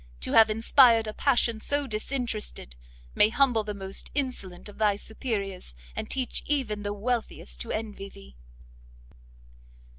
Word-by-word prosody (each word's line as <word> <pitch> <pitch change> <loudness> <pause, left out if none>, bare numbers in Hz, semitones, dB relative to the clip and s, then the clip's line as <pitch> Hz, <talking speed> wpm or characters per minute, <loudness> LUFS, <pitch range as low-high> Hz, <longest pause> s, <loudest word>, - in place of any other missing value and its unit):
to - - -4
have 225 -1 +7
inspired 225 +1 +5
a 215 - -3
passion 240 -4 +2
so 285 +3 0
disinterested, 215 - -4 0.4
may 210 - +6
humble 245 -3 +3
the 210 - -4
most 195 -1 -6
insolent 250 -11 -3
of 205 - -12
thy 210 -2 +3
superiors, 200 - -5 0.2
and - - -4
teach 260 -2 -1
even 255 -8 0
the 205 0 -3
wealthiest 205 - -3
to - - -5
envy 210 -2 -4
thee!" 65 - -15
220 Hz, 140 wpm, -27 LUFS, 200-250 Hz, 0.4 s, have